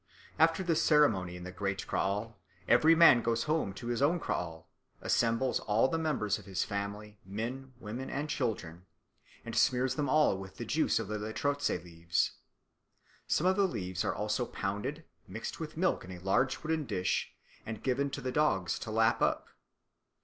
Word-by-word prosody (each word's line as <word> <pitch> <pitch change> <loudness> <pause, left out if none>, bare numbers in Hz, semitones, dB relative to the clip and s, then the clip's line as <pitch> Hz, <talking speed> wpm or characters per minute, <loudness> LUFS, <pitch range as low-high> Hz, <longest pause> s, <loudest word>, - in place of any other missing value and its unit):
After 165 +3 +4
this 165 -3 +1
ceremony 110 - +3
in 90 - -8
the 90 - -6
great 100 +1 -3
kraal 105 +2 -2 0.3
every 160 +2 +6
man 165 -8 +7
goes 115 0 0
home 155 -9 0
to 120 - -9
his 120 +1 -1
own 165 +5 +3
kraal, 80 - -4 0.3
assembles 115 +2 +1
all 110 +4 +2
the 165 - -1
members 130 -11 0
of - - -14
his 95 -1 -1
family, 105 +1 -5
men, 120 +7 -5
women, 120 +4 -6
and 145 +2 -3
children, 95 - -3 0.6
and - - -5
smears 130 0 +3
them 145 0 -1
all 150 -8 +4
with 95 -1 -10
the - - -5
juice - - +1
of - - -2
the 105 +1 -3
lerotse 140 +7 -1
leaves. 85 -1 -1 1.0
Some 165 - +1
of 185 +1 +4
the 200 -1 +3
leaves 95 - -3
are - - -1
also - - -1
pounded, 100 +2 -4 0.2
mixed - - -6
with - - -6
milk - - +1
in 90 - -9
a 90 - -7
large 95 +11 +1
wooden 160 -1 -1
dish, 95 -3 -1 0.3
and 110 -1 -7
given 135 +2 +1
to 135 - -5
the 130 -1 -2
dogs 95 - +1
to - - -6
lap 110 +1 +2
up. - - +1
115 Hz, 180 wpm, -31 LUFS, 95-145 Hz, 1.0 s, man